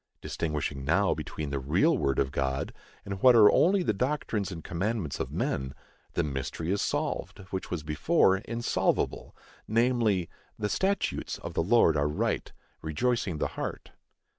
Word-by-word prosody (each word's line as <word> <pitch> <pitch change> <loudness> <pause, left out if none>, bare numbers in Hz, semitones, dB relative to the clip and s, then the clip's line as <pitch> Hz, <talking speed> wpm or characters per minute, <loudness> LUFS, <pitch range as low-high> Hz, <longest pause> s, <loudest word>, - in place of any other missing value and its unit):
Distinguishing 75 -3 -3
now 95 +8 +3
between 75 -3 -5
the 70 - -1
real 85 - +3
word 70 - 0
of 65 -1 +1
God 65 0 -2 0.3
and 100 -1 -5
what 125 -2 +7
are 105 -3 +8
only 185 +3 +4
the 110 - +1
doctrines 110 -5 -1
and 80 -3 -7
commandments 95 -2 -2
of - - -3
men, 65 -1 -2 0.4
the - - +1
mystery 75 +4 -3
is 100 - +1
solved, - - -2
which 95 - -4
was 85 -4 -3
before 75 +5 +3
insolvable, 115 +4 -1 0.3
namely, 115 -5 +2 0.3
"The 105 -1 -2
statutes 195 - -1
of - - -7
the - - +1
Lord 90 -3 +4
are 75 0 +2
right, 75 - -1 0.3
rejoicing 95 +3 -1
the - - -1
heart." - - -6
95 Hz, 155 wpm, -28 LUFS, 75-115 Hz, 0.4 s, are